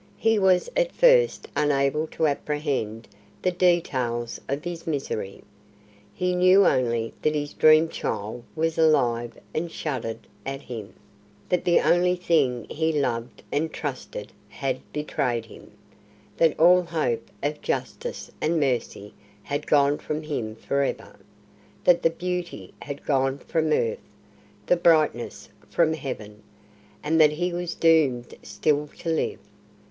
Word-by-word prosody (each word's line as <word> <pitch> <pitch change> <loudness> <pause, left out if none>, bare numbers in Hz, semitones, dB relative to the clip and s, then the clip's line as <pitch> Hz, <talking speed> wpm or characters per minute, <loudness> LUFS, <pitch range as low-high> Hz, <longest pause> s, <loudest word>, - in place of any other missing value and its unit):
He 225 -1 +2
was 185 -2 +3
at - - +2
first - - +4
unable 145 +1 +1
to 160 - -1
apprehend 140 -7 -2 0.4
the 185 - +2
details 130 -10 0
of 140 +3 -2
his 175 -1 -6
misery. 135 -10 -3 0.7
He 180 +11 -1
knew 185 +2 +5
only 120 -5 +1
that 155 0 +1
his 145 0 -3
dream 155 +1 +6
child 110 -5 -4
was 160 0 -1
alive 120 -7 +2 0.2
and 165 +1 -2
shuddered 125 -9 -3 0.3
at 135 +3 -5
him, 110 -5 -8 0.5
that 180 - 0
the 175 - +5
only 180 +1 +3
thing 150 -9 +1
he 160 +1 0
loved 120 -6 -2
and 155 +2 0
trusted - - -6 0.2
had 130 -2 -3
betrayed 130 -6 -2
him, 110 - -14 0.7
that 165 -2 +3
all 180 +3 +7
hope 155 -10 -2
of 150 +1 -2
justice 485 0 -4
and 165 +1 +1
mercy 120 -7 -2 0.3
had 145 +7 -4
gone 145 0 +3
from 150 +1 -4
him 120 -8 -4
for 140 +4 -1
ever, 140 - -3 0.7
that 175 -1 +5
the 165 - +4
beauty 180 +1 -5
had 140 0 -7
gone 135 -1 +1
from 160 +2 -1
earth, 115 -6 +1 0.6
the 180 - +3
brightness 155 -8 +2 0.2
from 160 -2 +2
Heaven, 110 -8 -6 0.6
and 160 +2 +3
that 150 -1 +6
he 175 +3 -2
was 175 -1 -3
doomed 145 -8 +3
still 145 +8 0
to 170 - -5
live. 160 - 0
150 Hz, 135 wpm, -25 LUFS, 130-170 Hz, 0.7 s, all